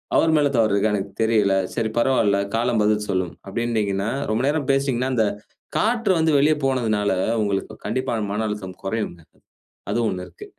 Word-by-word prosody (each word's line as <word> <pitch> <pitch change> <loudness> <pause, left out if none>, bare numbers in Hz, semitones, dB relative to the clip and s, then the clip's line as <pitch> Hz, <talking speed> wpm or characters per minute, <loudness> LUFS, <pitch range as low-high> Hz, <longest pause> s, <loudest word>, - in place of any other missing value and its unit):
அவர் 160 - +4
மேல 145 - +3
தவறு 110 -3 +3
இருக்கா? 100 +2 +2
எனக்கு 100 0 -4
தெரியல. 110 -3 +3 0.2
சரி 115 -1 0
பரவால்ல, 115 -5 +3 0.2
காலம் 115 -1 +1
பதில் 105 0 +1
சொல்லும்" 95 -2 -1 0.2
அப்டின்னீங்கனா 105 -2 -1 0.2
ரொம்ப 115 +4 0
நேரம் 145 -2 0
பேசினீங்கனா 135 -2 0
அந்த 110 - +3 0.5
காற்று 230 -2 +2
வந்து 160 0 +3
வெளிய 150 +2 +4
போனதுனால 110 -6 +1 0.3
உங்களுக்கு 100 -2 -2
கண்டிப்பா 130 -1 -1
அந்த 105 -2 -2
மன 110 +2 -1
அழுத்தம் 100 -3 -6
குறையுங்க. 95 -4 -3 0.7
அது - - 0
ஒண்ணு 90 0 -4
இருக்கு. - - -12
110 Hz, 165 wpm, -22 LUFS, 100-130 Hz, 0.7 s, அவர்